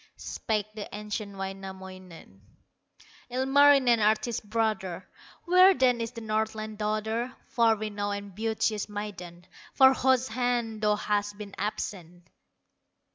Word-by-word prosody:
Spake 215 -3 -2
the 210 -2 -7
ancient 210 -1 -5
Wainamoinen: 190 - -9 0.9
"Ilmarinen, 265 -1 +5
artist 215 0 0
brother, 215 -5 -1 0.4
Where 365 +2 +6
then 250 -4 +2
is 230 - -2
the 235 -1 -9
Northland 215 0 -3
daughter, 220 +4 -2
Far 230 -2 +3
renowned 205 -1 -3
and 200 -1 -9
beauteous 220 -1 -1
maiden, 180 -4 -7 0.3
For 265 -1 +7
whose 260 -1 +2
hand 235 -2 -1
thou 210 -1 +3
hast 205 0 -1
been 205 -2 -9
absent?" 180 -4 -5
215 Hz, 115 wpm, -28 LUFS, 200-235 Hz, 0.9 s, For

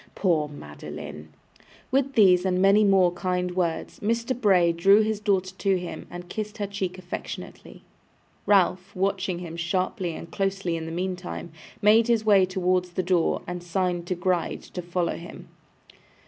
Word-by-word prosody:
Poor 165 -6 +1
Madeline!' 75 - -9 0.6
With 275 +1 +1
these 185 -6 +5
and 185 -1 +1
many 200 +3 +5
more 190 -3 +4
kind 180 0 -2
words, 170 -3 -2
Mr. 230 +4 0
Bray 190 -7 +4
drew 195 +5 +5
his 215 -1 -1
daughter 190 -3 0
to 195 -1 +1
him 180 -1 -7
and 175 0 -8
kissed 210 +3 -5
her 205 - -2
cheek 190 -2 -4
affectionately. 180 -1 -8 0.6
Ralph, 190 0 +2
watching 190 -1 -1
him 170 -2 -7
sharply 180 +1 -2
and 165 - -9
closely 195 -3 -1
in 160 -1 -5
the - - -5
meantime, 180 -1 -4 0.3
made 220 +2 +6
his 230 -2 +2
way 195 -3 +5
towards 180 -1 0
the 185 - -1
door, 180 -2 +1
and 180 0 -5
signed 175 0 -1
to 185 - -1
Gride 175 -1 -1
to 180 - -7
follow 175 0 -2
him. 170 - -11
185 Hz, 160 wpm, -25 LUFS, 175-200 Hz, 0.6 s, made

